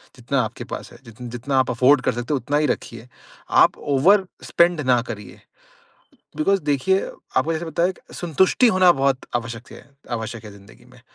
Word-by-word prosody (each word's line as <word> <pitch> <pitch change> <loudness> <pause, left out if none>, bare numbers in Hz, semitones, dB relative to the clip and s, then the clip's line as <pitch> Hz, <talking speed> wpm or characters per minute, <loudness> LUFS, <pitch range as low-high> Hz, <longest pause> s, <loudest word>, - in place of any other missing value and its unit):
जितना 130 +2 -2
आपके 110 - -6
पास - - -8
है, - - -14
जित 115 +2 -15
जितना 125 +3 -3
आप 130 - +1
अफोर्ड 130 +3 +4
कर - - +1
सकते 120 +5 -3
हैं 140 - +1
उतना 145 +5 -1
ही 150 - +2
रखिए। 115 -2 -4 0.6
आप - - +2 0.2
ओवर-स्पेंड 175 0 +2
ना 125 -3 +2
करिए। 105 -3 -8 1.0
बिकॉज़ 195 +5 +1
देखिए, 150 +7 +1 0.4
आपको 165 - +2
जैसे 160 +1 -3
बताया 170 +2 0
कि - - -18
संतुष्टि 180 - +2
होना 185 -4 +5
बहुत 135 -3 0
आवश्यकत 115 0 -7
है, - - -13 0.3
आवश्यक 115 -1 -5
है 105 - -10
ज़िंदगी 100 +3 -17
में। 125 - -18
135 Hz, 180 wpm, -22 LUFS, 120-165 Hz, 1.0 s, होना